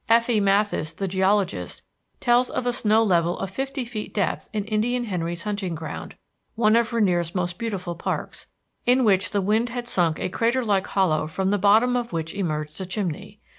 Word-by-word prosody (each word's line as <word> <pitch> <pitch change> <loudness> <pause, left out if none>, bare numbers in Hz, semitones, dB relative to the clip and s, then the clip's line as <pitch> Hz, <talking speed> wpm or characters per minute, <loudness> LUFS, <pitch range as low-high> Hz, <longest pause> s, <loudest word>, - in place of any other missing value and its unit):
F.E. 230 0 +4
Matthes, 200 -5 +1
the 195 - -2
geologist, 190 - 0 0.4
tells 245 +1 +3
of - - -3
a 245 - +1
snow 220 -1 +3
level 175 -4 +2
of 195 -1 -4
fifty 270 +3 -3
feet 225 -2 -6
depth 195 -5 -1
in 210 -2 -2
Indian 230 +3 0
Henry's 175 -5 -3
Hunting 200 -5 -3
Ground, 160 0 -7 0.4
one 220 -1 +4
of 235 0 +2
Rainier's 180 -7 +1
most 175 -1 -2
beautiful 195 -6 -3
parks, 170 - -4 0.4
in 255 +1 +4
which 190 -4 +3
the 200 - 0
wind 220 +5 +1
had 240 0 -5
sunk 170 -8 +1
a - - -1
crater 235 +6 0
like 200 -3 +1
hollow 155 -6 +1
from 190 +4 -1
the 205 - +1
bottom 220 +6 +4
of 240 -1 -2
which 165 -1 -3
emerged 155 -4 -3
a - - -3
chimney. 200 +2 -4
200 Hz, 185 wpm, -24 LUFS, 175-230 Hz, 0.4 s, F.E